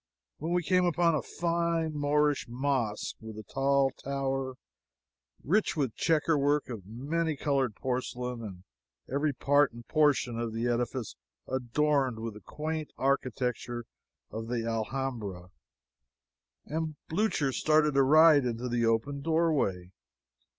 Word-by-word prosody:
when 160 +3 -3
we 175 0 +1
came 185 +1 +3
upon 175 -1 +3
a 155 - +1
fine 170 -1 -1
Moorish 145 0 +1
mosque, 120 -4 -1
with 110 -1 -8
tall 135 0 +2
tower, 135 -1 -3 0.9
rich 200 +3 +1
with 135 -7 0
checker 160 -2 +2
work 145 0 +1
of 105 -6 -7
many 150 +7 -2
colored 135 -6 0
porcelain, 125 -1 -3
and 95 -4 -8 0.4
every 145 +3 0
part 145 +2 +3
and 120 0 -12
portion 145 -6 +2
of 115 -1 -3
the 115 +1 -2
edifice 120 -1 -2 0.3
adorned 130 0 +1
with 115 0 -5
the 105 - -12
quaint 155 0 -4
architecture 125 -3 -1 0.5
of 110 +1 -5
the 115 -1 -2
Alhambra, 115 -5 -3 1.1
and 155 0 -3
Blucher 160 -6 +1
started 155 +2 +3
to 135 - +4
ride 155 +1 +7
into 120 0 -2
the 120 -1 0
open 115 +5 +1
doorway. 150 - +1
135 Hz, 130 wpm, -30 LUFS, 120-155 Hz, 1.1 s, ride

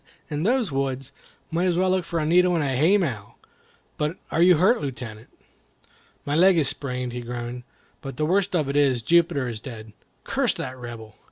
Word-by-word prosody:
in 145 0 -2
those 230 - +1
woods? 135 -1 -2 0.4
Might 170 +3 0
as 175 -2 +1
well 185 0 +2
look 185 -2 0
for 170 - -3
a 155 - 0
needle 180 +2 +4
in 160 - +1
a 140 - 0
haymow. 150 - +1 0.6
But 150 +3 -2
are 165 - +1
you 180 -1 +6
hurt, 210 +9 +3
Lieutenant?" 120 -5 -6 1.0
"My 145 - -1
leg 185 +2 +5
is 150 -4 +3
sprained," 125 -3 -3
he 125 - -4
groaned; 120 +1 -6 0.4
"but 135 -4 -7
the 155 - 0
worst 190 +3 +1
of 155 -5 +1
it 140 - -3
is, 135 -5 +2
Jupiter 165 -4 +2
is 115 -3 -5
dead. 110 -4 -9 0.3
Curse - - 0
that 130 -1 -5
Rebel! 115 -3 -9
145 Hz, 190 wpm, -24 LUFS, 125-175 Hz, 1.0 s, you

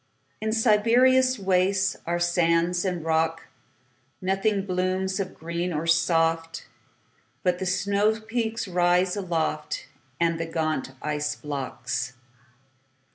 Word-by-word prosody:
In 220 0 -1
Siberia's 245 +4 +4
wastesAre 190 -2 +1
sands 175 +1 +2
and 180 -4 -2
rocks. 165 0 +1 0.8
Nothing 195 +1 0
blooms 185 +1 -1
of 190 -2 -4
green 170 +2 -3
or 155 0 -2
soft, 165 0 +1 0.8
But 180 -2 +1
the 190 - -2
snowpeaks 220 +5 0
rise 180 0 +2
aloftAnd 160 -4 -2
the 165 - -2
gaunt 155 -5 -1
ice 150 0 -1
blocks. 135 -3 -4
180 Hz, 95 wpm, -25 LUFS, 165-195 Hz, 0.8 s, Siberia's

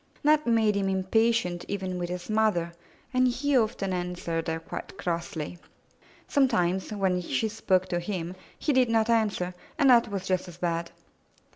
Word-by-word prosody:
That 305 -1 +4
made 225 -2 +3
him 195 -1 0
impatient 190 -1 +1
with - - -13
even 185 -3 -3
his 175 0 -4
mother, 215 -6 +1 0.4
and 255 0 +4
he 270 +3 0
often 215 -5 +1
answered 175 -2 -3
her 160 0 -1
quite 190 - -8
crossly. 170 -2 -3 0.7
Some 275 -2 +4
times, 190 -5 0
when 190 -3 0
she 175 +5 -1
spoke 195 -4 +1
to 175 - 0
him, 175 -1 -4 0.2
he 295 - 0
did 255 -2 +4
not 225 0 +2
answer, 205 -5 +1 0.2
and 280 -4 +5
that 235 -2 +5
was 195 -2 -4
just 185 -1 0
as 175 -2 -10
bad. 170 -1 -1
190 Hz, 165 wpm, -27 LUFS, 175-225 Hz, 0.7 s, and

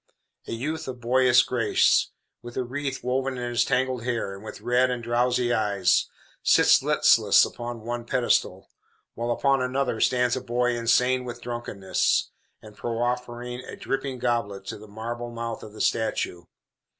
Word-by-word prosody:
A - - -6
youth 155 +7 -4
of 130 -2 -6
boyish 125 +1 +4
grace, 115 -4 +2 0.3
with 120 0 -10
a 130 - 0
wreath 135 +2 -4
woven 130 +1 -1
in 120 0 -3
his 120 - +2
tangled 130 -2 0
hair, 115 -5 -2
and 95 +1 -11
with 110 - -8
red 125 +1 +2
and 125 -2 -3
drowsy 120 +1 +1
eyes, 100 -5 +2 0.3
sits - - +5
listless - - +5
upon 120 -1 -6
one 120 0 -4
pedestal, 120 +1 0 0.4
while 120 +1 -4
upon 135 +2 +2
another 130 +1 -1
stands 125 -1 +2
a 130 - -3
boy 125 0 0
insane 125 +2 +2
with 120 -1 -7
drunkenness, 120 -5 -1 0.3
and 105 -1 -13
proffering 120 +2 -3
a - - -9
dripping 135 -1 -3
goblet 115 -6 -2
to 105 - -6
the 110 - -12
marble 120 +3 -6
mouth 115 -1 -5
of 105 - -10
the 110 - -8
statue. 90 -6 -1
120 Hz, 160 wpm, -25 LUFS, 115-125 Hz, 0.4 s, sits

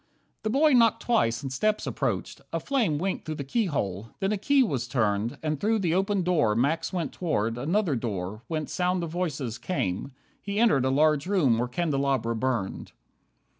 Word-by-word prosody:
The 215 - -2
boy 290 +5 +4
knocked 230 -3 +4
twice, 130 - +1
and 135 -1 -4
steps 215 +10 0
approached. - - -2
A - - -1
flame 235 - 0
Winked 190 +4 -2
through 155 - -4
the 145 - -4
keyhole, 130 - -1
then 195 +1 0
a 210 - +1
key 280 +5 +4
was 135 - -2
turned, 110 -2 0
And 155 -2 -1
through 220 +2 +2
the 175 -6 0
open 195 +1 +1
door 155 -12 +2
Max 160 +8 0
went 175 -6 -2
toward 115 - -1
Another 165 - 0
door, 105 -3 -4
whence 155 -2 -3
sound 180 0 0
of 165 - -4
voices 150 -9 -3
came. 135 - -2 0.3
He 200 +1 -3
entered 150 - +4
a - - +2
large 150 +2 +3
room 150 - +3
where 120 - 0
candelabra 135 -5 0
burned. 115 -5 -2
155 Hz, 180 wpm, -27 LUFS, 120-195 Hz, 0.3 s, boy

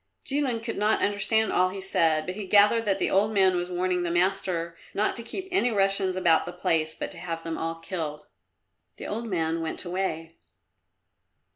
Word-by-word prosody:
Jilin 265 -5 -1
could 225 -3 -4
not 210 +1 +2
understand 210 +2 +2
all 185 0 +3
he 195 +1 -7
said, 165 -5 +1
but 185 - -4
he 200 0 -6
gathered 210 +3 +5
that 195 -2 +2
the - - 0
old 205 +3 +3
man 190 -3 +4
was 175 0 -2
warning 180 0 0
the 175 - -1
master 175 -1 0 0.2
not 210 - +1
to - - -5
keep 380 +11 -6
any 360 -10 +2
Russians 195 -3 +1
about 175 -3 +3
the - - -4
place, 160 -3 0
but - - -5
to - - -9
have 165 -1 -5
them 165 -1 -4
all 165 +1 -3
killed. 160 -3 -5 0.7
The - - -8
old 230 +3 -4
man 165 -4 -1
went 160 +3 -3
away. 170 -3 -3
185 Hz, 190 wpm, -26 LUFS, 165-205 Hz, 0.7 s, gathered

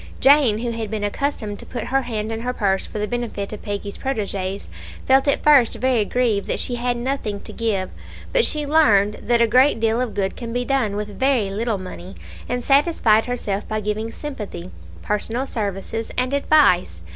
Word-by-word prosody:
Jane, 270 -6 +5
who 235 +1 -2
had 225 -2 -4
been 215 -1 -3
accustomed 210 -2 -2
to - - -10
put 245 - -5
her 270 - +4
hand 220 -3 -4
in 225 0 -4
her 250 +1 -2
purse 195 -5 0
for - - -7
the 210 0 -1
benefit 230 -4 -4
of 210 - -7
Peggy's 205 -1 -5
proteges, 200 -6 -3 0.4
felt 265 +2 +4
at 280 - +1
first 275 -6 +5
very 240 -2 +1
grieved 225 -4 0
that - - -1
she 245 - 0
had 245 0 -1
nothing 240 -5 -2
to - - -6
give, 210 -5 -1 0.4
but - - +4
she 300 -7 +1
learned 210 -10 +3
that 235 0 +3
a - - +5
great 255 +3 +4
deal 225 +1 +1
of 250 -4 -3
good 195 -1 -1
can 235 -1 -6
be 245 +1 -1
done 250 -7 0
with 210 -1 -5
very 260 -7 +2
little 220 +1 -1
money, 185 0 -9 0.3
and 245 0 -2
satisfied 275 -7 +3
herself 210 -5 -3
by 215 0 -2
giving 215 +2 -3
sympathy, 210 - -7 0.3
personal 225 +5 -1
services, 220 -1 -4
and 250 +2 0
advice. 230 - +3
225 Hz, 190 wpm, -21 LUFS, 205-255 Hz, 0.4 s, Jane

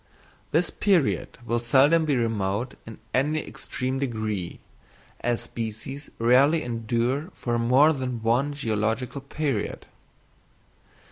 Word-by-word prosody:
This 165 +2 +1
period 190 -8 +1
will 120 0 0
seldom 140 +7 +4
be 145 -3 +2
remote 110 +1 -1
in 110 - -8 0.2
any 150 +4 +1
extreme 130 +1 -4
degree, 110 -8 -3 0.6
as 120 -1 0
species 115 +5 -6
rarely 135 +7 +4
endure 120 - -1
for 120 -1 -1
more 130 +7 +5
than 125 -5 -4
one 125 +6 +2
geological 115 +1 -1
period. 140 -4 -3
125 Hz, 110 wpm, -26 LUFS, 115-140 Hz, 0.6 s, more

